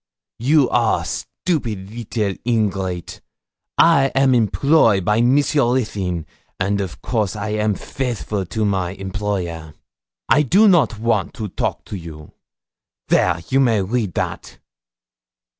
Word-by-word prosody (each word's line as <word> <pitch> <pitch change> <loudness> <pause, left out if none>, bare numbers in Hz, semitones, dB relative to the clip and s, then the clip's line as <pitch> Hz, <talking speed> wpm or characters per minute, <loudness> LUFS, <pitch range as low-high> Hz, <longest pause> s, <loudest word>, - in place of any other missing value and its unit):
'You 140 +3 +3
are - - +2
stupid 110 - -3
little 110 -3 -2
ingrate, 95 -6 -2 0.6
I 165 -5 +5
am 135 -1 +4
employ 115 0 +3
by 105 +5 +1
Monsieur 130 0 +3
Ruthyn, 95 -9 -2 0.3
and 100 +1 0
of 95 -3 -7
course 110 -5 -1
I 105 0 -4
am 105 -1 0
faithful 115 -6 -3
to 110 +4 -1
my 95 -3 -1
employer. 95 -5 -4 0.5
I 150 - +4
do 195 - +4
not 170 - +3
want 110 -4 -1
to 105 -2 -5
talk - - -3
to - - -7
you. 80 -4 -10 0.8
There, 85 -2 +2
you 135 - +2
may 115 -7 +3
read 105 -3 -2
that.' - - -4
105 Hz, 125 wpm, -20 LUFS, 95-125 Hz, 0.8 s, I